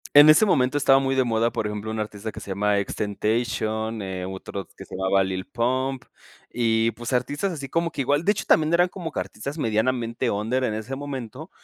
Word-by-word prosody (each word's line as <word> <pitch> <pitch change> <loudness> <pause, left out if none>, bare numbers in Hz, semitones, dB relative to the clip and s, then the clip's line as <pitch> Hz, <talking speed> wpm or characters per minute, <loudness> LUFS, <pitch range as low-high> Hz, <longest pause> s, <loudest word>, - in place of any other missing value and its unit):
En 145 +1 +10
ese 155 +8 +7
momento 135 -9 +2
estaba 135 -1 +5
muy 135 0 0
de 130 - +3
moda, 115 -1 +1
por 105 - -2
ejemplo, 105 +1 -5
un 110 - -3
artista 105 0 -5
que - - -9
se - - -9
llama 105 +2 +1
XXXTentation, 110 +2 -1 0.3
otro 95 0 -6
que - - -9
se - - -8
llamaba 95 +1 +2
Lil 95 0 -3
Pump 130 +2 -1 0.5
y, 115 -1 +2
pues, 120 +3 -6
artistas 145 +10 0
así 140 -4 -6
como 165 +2 0
que - - -4
igual 145 +4 +1
de 205 - +4
hecho, 210 - -4
también 160 +1 +3
eran 175 +1 +4
como 175 -3 -6
que - - -2
artistas 105 - -6
medianamente 115 -1 0
under 115 +5 0
en 110 -4 0
ese 110 +5 -5
momento. 140 - -6
120 Hz, 205 wpm, -24 LUFS, 110-140 Hz, 0.5 s, En